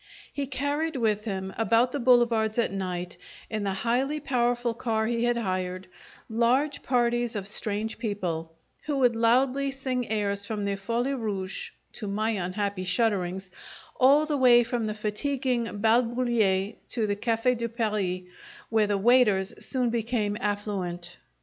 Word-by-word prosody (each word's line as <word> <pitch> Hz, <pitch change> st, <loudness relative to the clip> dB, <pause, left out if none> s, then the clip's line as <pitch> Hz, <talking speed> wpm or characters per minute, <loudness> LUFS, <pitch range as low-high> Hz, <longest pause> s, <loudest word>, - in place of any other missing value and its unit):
He 280 Hz, -1 st, -3 dB
carried 285 Hz, +4 st, -1 dB
with 215 Hz, -3 st, 0 dB
him, 190 Hz, -2 st, -4 dB
about 230 Hz, +2 st, +3 dB
the 285 Hz, -, -2 dB
boulevards 235 Hz, -3 st, +3 dB
at 235 Hz, -, +1 dB
night, 180 Hz, -2 st, -4 dB, 0.3 s
in 215 Hz, -1 st, -2 dB
the 200 Hz, -, 0 dB
highly 250 Hz, +9 st, 0 dB
powerful 245 Hz, -3 st, 0 dB
car 225 Hz, -1 st, -1 dB
he 235 Hz, +1 st, 0 dB
had 240 Hz, 0 st, +2 dB
hired, 185 Hz, -3 st, -2 dB, 0.4 s
large 250 Hz, +6 st, +1 dB
parties 240 Hz, -2 st, +1 dB
of 200 Hz, -2 st, -4 dB
strange 210 Hz, +1 st, -3 dB
people, 180 Hz, -8 st, -3 dB, 0.3 s
who 295 Hz, -2 st, -1 dB
would 245 Hz, -3 st, +3 dB
loudly 255 Hz, +4 st, +2 dB
sing 260 Hz, -2 st, -3 dB
airs 200 Hz, -2 st, -1 dB
from 205 Hz, 0 st, -3 dB
the 200 Hz, 0 st, 0 dB
Folie 235 Hz, +7 st, -1 dB
Rouge 200 Hz, -7 st, -4 dB, 0.2 s
(to 210 Hz, -, -6 dB
my 215 Hz, +3 st, 0 dB
unhappy 195 Hz, 0 st, -2 dB
shudderings) 190 Hz, -1 st, 0 dB, 0.4 s
all 280 Hz, +4 st, +5 dB
the 300 Hz, -2 st, -1 dB
way 245 Hz, -2 st, +6 dB
from 235 Hz, -1 st, -2 dB
the 215 Hz, -, -3 dB
fatiguing 235 Hz, +2 st, -1 dB
Bal 225 Hz, +3 st, +4 dB
Bullier 230 Hz, -5 st, +1 dB, 0.2 s
to 230 Hz, -3 st, 0 dB
the 205 Hz, -1 st, 0 dB
Cafe' 230 Hz, +3 st, +1 dB
de 235 Hz, -1 st, -3 dB
Paris, 210 Hz, -6 st, -1 dB, 0.5 s
where 220 Hz, -2 st, +3 dB
the 205 Hz, -1 st, +1 dB
waiters 210 Hz, -2 st, +4 dB
soon 250 Hz, -3 st, 0 dB
became 225 Hz, -3 st, -1 dB
affluent. 190 Hz, -4 st, -3 dB
225 Hz, 150 wpm, -27 LUFS, 200-245 Hz, 0.5 s, way